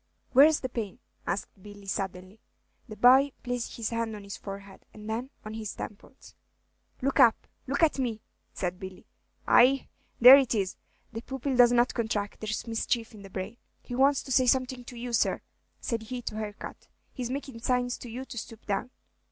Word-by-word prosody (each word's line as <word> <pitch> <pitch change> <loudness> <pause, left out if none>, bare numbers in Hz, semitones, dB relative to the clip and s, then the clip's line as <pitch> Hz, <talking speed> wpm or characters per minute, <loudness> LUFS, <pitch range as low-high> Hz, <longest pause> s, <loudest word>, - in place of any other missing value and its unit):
"Where's 295 +4 +6
the 255 - -2
pain?" 225 -6 -5 0.3
asked 190 +2 -4
Billy, 205 0 -12
suddenly. 190 +1 -4 0.5
The 215 - -7
boy 260 +5 +6
placed 245 -1 -3
his 230 -1 -3
hand 230 -1 -2
on 205 - -9
his 200 0 -7
forehead, 195 -1 -9
and 210 0 -10
then 230 +4 -3 0.2
on 215 - -6
his 220 -2 -5
temples. 220 +5 -10 0.7
"Look 275 +2 +1
up! 240 -4 +5 0.2
look 280 +5 0
at 305 -3 +3
me!" 230 -4 -2 0.3
said 180 -1 -3
Billy. 190 -1 -9 0.4
"Ay, 265 +2 +5 0.3
there 255 +3 +11
it 255 -4 0
is! 195 -3 -1 0.4
the 225 - -4
pupil 265 +1 -3
does 245 -1 +7
not 245 0 +3
contract, 220 -3 -2
there's 215 0 -3
mischief 230 0 -1
in 210 - -12
the 195 - -11
brain. 190 +5 -6 0.3
He - - -8
wants 270 +2 +3
to 265 - -8
say 255 0 +4
something 255 0 +1
to 245 - -10
you, 240 0 -5
sir," - - +2 0.4
said 230 -2 -2
he 245 +2 -6
to 215 - -5
Harcourt; 215 -1 -7 0.3
"he's 250 -3 -4
makin' 270 -2 -5
signs 245 +1 0
to 245 - -9
you 250 +4 -6
to 235 - -6
stoop 225 0 -10
down." 205 +4 -2
230 Hz, 185 wpm, -28 LUFS, 210-255 Hz, 0.7 s, there